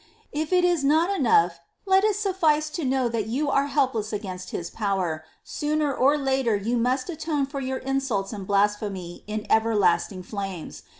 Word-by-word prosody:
9. 295 Hz, -, -1 dB
If 315 Hz, -, -9 dB
this 360 Hz, -1 st, +3 dB
is 350 Hz, -5 st, +2 dB
not 320 Hz, +6 st, +3 dB
enough, 425 Hz, +2 st, +3 dB, 0.3 s
let 385 Hz, 0 st, +4 dB
it 425 Hz, -1 st, +3 dB
suflice 320 Hz, -7 st, +1 dB
to 335 Hz, -, -3 dB
know 260 Hz, -1 st, +1 dB
that 225 Hz, -2 st, -2 dB
you 280 Hz, +5 st, -1 dB
are 275 Hz, +1 st, +2 dB
helpless 260 Hz, -7 st, 0 dB
against 185 Hz, -4 st, -5 dB
His 170 Hz, -1 st, -5 dB
power 190 Hz, -7 st, -1 dB
— -, -, -41 dB
sooner 300 Hz, -1 st, -1 dB
or 275 Hz, +4 st, +3 dB
later 265 Hz, -5 st, +1 dB
you 215 Hz, +4 st, -1 dB
must 250 Hz, +2 st, 0 dB
atone 310 Hz, -4 st, -1 dB
for 275 Hz, +1 st, -6 dB
your 260 Hz, 0 st, -2 dB
insults 260 Hz, -8 st, -2 dB
and 195 Hz, -3 st, -7 dB
blasphemy 200 Hz, -3 st, -1 dB
in 215 Hz, 0 st, -4 dB
everlasting 210 Hz, -4 st, +2 dB
flames. 195 Hz, -4 st, -6 dB
260 Hz, 180 wpm, -25 LUFS, 205-300 Hz, 0.3 s, let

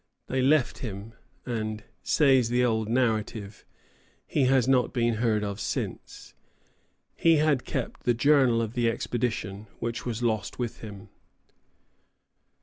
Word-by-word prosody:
They 130 Hz, 0 st, -1 dB
left 135 Hz, 0 st, +2 dB
him, 105 Hz, -1 st, -7 dB, 0.3 s
and, 110 Hz, -3 st, -3 dB, 0.2 s
says 135 Hz, -5 st, +3 dB
the 125 Hz, +1 st, +2 dB
old 110 Hz, -2 st, 0 dB
narrative, 110 Hz, -4 st, -1 dB, 0.6 s
"he 140 Hz, -, +1 dB
has 130 Hz, -2 st, +3 dB
not 130 Hz, -2 st, +3 dB
been 120 Hz, -3 st, +1 dB
heard 110 Hz, -3 st, +2 dB
of 100 Hz, 0 st, -4 dB
since." -, -, -5 dB, 0.8 s
He 165 Hz, -1 st, +4 dB
had 150 Hz, -4 st, +2 dB
kept -, -, -4 dB
the 120 Hz, -1 st, +1 dB
journal 130 Hz, -3 st, +4 dB
of 110 Hz, 0 st, -5 dB
the 120 Hz, -2 st, +2 dB
expedition, 110 Hz, -3 st, -3 dB
which 115 Hz, 0 st, -4 dB
was 120 Hz, -1 st, -3 dB
lost 110 Hz, -4 st, -1 dB
with 120 Hz, -3 st, -4 dB
him. 105 Hz, -2 st, -10 dB
120 Hz, 135 wpm, -27 LUFS, 110-130 Hz, 0.8 s, He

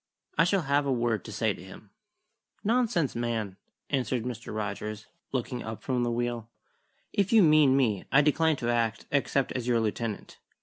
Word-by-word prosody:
I 165 Hz, -, +4 dB
shall 185 Hz, 0 st, +2 dB
have 140 Hz, 0 st, +1 dB
a -, -, +1 dB
word 120 Hz, -5 st, 0 dB
to -, -, -7 dB
say -, -, 0 dB
to -, -, -12 dB
him." -, -, -13 dB, 0.7 s
"Nonsense, 220 Hz, -, +1 dB
man!" 115 Hz, -5 st, -2 dB, 0.3 s
answered 125 Hz, -4 st, 0 dB
Mr. 120 Hz, -1 st, -6 dB
Rogers, 105 Hz, 0 st, -4 dB, 0.3 s
looking 125 Hz, -1 st, -2 dB
up 110 Hz, 0 st, -7 dB
from 125 Hz, -2 st, 0 dB
the 120 Hz, -, +1 dB
wheel. 120 Hz, -1 st, -2 dB, 0.6 s
"If 200 Hz, -1 st, +1 dB
you 225 Hz, -3 st, +7 dB
mean 150 Hz, -4 st, +5 dB
me, 110 Hz, -8 st, +1 dB
I 140 Hz, -, +6 dB
decline 155 Hz, +2 st, +3 dB
to 120 Hz, -3 st, -1 dB
act 115 Hz, -2 st, 0 dB
except 140 Hz, -1 st, +1 dB
as 125 Hz, -2 st, -3 dB
your 120 Hz, -2 st, +3 dB
lieutenant. 110 Hz, 0 st, -3 dB
125 Hz, 175 wpm, -28 LUFS, 115-145 Hz, 0.7 s, you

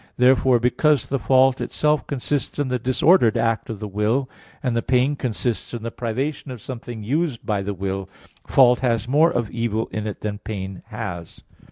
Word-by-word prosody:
Therefore, 125 Hz, 0 st, +4 dB
because 140 Hz, +4 st, +2 dB
the 140 Hz, -, -2 dB
fault 130 Hz, +1 st, +3 dB
itself 150 Hz, 0 st, 0 dB
consists 140 Hz, +1 st, -2 dB
in 145 Hz, -3 st, -1 dB
the 125 Hz, 0 st, 0 dB
disordered 130 Hz, -, +4 dB
act 115 Hz, -1 st, 0 dB
of 110 Hz, -, -4 dB
the 105 Hz, -, -5 dB
will, 105 Hz, +7 st, 0 dB, 0.4 s
and 125 Hz, -3 st, 0 dB
the 115 Hz, -, +1 dB
pain 130 Hz, +4 st, +2 dB
consists 120 Hz, -2 st, -3 dB
in 115 Hz, -, -6 dB
the 115 Hz, -, -4 dB
privation 135 Hz, +6 st, -3 dB
of 125 Hz, -2 st, -7 dB
something 120 Hz, -1 st, -7 dB
used 145 Hz, +2 st, -1 dB
by 105 Hz, -2 st, 0 dB
the 100 Hz, +1 st, -3 dB
will, 95 Hz, 0 st, -4 dB, 0.4 s
fault 125 Hz, -2 st, +5 dB
has 115 Hz, -3 st, 0 dB
more 150 Hz, +6 st, +4 dB
of 120 Hz, -3 st, -2 dB
evil 115 Hz, -1 st, -1 dB
in 110 Hz, 0 st, -3 dB
it 105 Hz, -, -6 dB
than 105 Hz, -1 st, -3 dB
pain 95 Hz, -3 st, -6 dB
has. 90 Hz, -7 st, -7 dB
120 Hz, 185 wpm, -22 LUFS, 110-130 Hz, 0.4 s, fault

